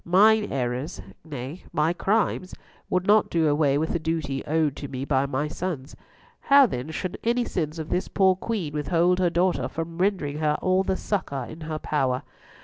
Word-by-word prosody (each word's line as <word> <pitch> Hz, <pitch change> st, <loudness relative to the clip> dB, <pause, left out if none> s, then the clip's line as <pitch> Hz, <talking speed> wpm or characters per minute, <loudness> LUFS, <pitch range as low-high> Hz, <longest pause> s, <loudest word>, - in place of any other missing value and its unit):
Mine 210 Hz, +4 st, +4 dB
errors, 130 Hz, +5 st, -2 dB, 0.2 s
nay, 145 Hz, +1 st, -7 dB
my 155 Hz, +3 st, +1 dB
crimes, 195 Hz, -1 st, 0 dB, 0.3 s
would 185 Hz, 0 st, 0 dB
not 210 Hz, +2 st, +4 dB
do 165 Hz, -2 st, +2 dB
away 145 Hz, -1 st, +3 dB
with 160 Hz, +2 st, -1 dB
the 170 Hz, -, 0 dB
duty 155 Hz, -4 st, -2 dB
owed 155 Hz, -2 st, +1 dB
to 140 Hz, -, -5 dB
me 130 Hz, 0 st, -5 dB
by 140 Hz, -1 st, +1 dB
my 140 Hz, +2 st, -1 dB
sons. 150 Hz, -4 st, -5 dB, 0.4 s
How, 280 Hz, -1 st, +6 dB
then, 130 Hz, -, -4 dB
should 175 Hz, +3 st, -4 dB
any 240 Hz, +1 st, +1 dB
sins 155 Hz, -5 st, -3 dB
of 160 Hz, -1 st, -5 dB
this 180 Hz, -, 0 dB
poor 190 Hz, -2 st, +3 dB
Queen 190 Hz, -6 st, -3 dB
withhold 170 Hz, +4 st, +2 dB
her 180 Hz, -2 st, +3 dB
daughter 175 Hz, +2 st, +1 dB
from 165 Hz, +1 st, -6 dB
rendering 180 Hz, -7 st, 0 dB
her 150 Hz, -1 st, +1 dB
all 185 Hz, 0 st, +2 dB
the 190 Hz, 0 st, -1 dB
succour 140 Hz, -, -2 dB
in 160 Hz, +5 st, -10 dB
her 155 Hz, -, -2 dB
power? 130 Hz, -4 st, 0 dB
160 Hz, 185 wpm, -25 LUFS, 145-185 Hz, 0.4 s, How